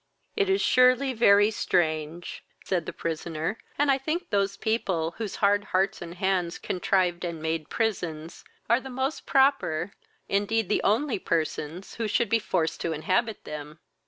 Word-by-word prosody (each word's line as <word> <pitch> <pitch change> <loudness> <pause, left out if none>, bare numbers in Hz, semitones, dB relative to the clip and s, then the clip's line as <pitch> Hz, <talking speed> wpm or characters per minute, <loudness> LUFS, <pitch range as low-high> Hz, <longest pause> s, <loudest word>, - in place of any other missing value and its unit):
"It 405 -3 +1
is 385 +1 +2
surely 255 +1 +4
very 205 -2 +5
strange, 160 -4 -1 0.2
(said 175 -4 -1
the - - -2
prisoner,) 165 +4 -3 0.2
and 290 0 +3
I 270 - +2
think 310 +6 -3
those 200 -1 +1
people, 185 -7 0
whose 215 -4 -3
hard 205 0 +2
hearts 190 +1 0
and 170 0 -7
hands 185 -2 0
contrived 180 -1 0
and 170 -2 -4
made 160 -1 -2
prisons, 175 -8 -3 0.2
are 235 +3 +4
the 265 - -9
most 265 +3 -3
proper, 265 - +2 0.3
indeed 205 +1 0
the - - +2
only 230 +3 +1
persons 165 +2 -2
who 230 -1 -1
should 210 +1 +1
be 230 - +3
forced 175 -6 -1
to 165 - -1
inhabit 185 +8 -1
them." 150 0 -7
195 Hz, 160 wpm, -27 LUFS, 165-230 Hz, 0.3 s, very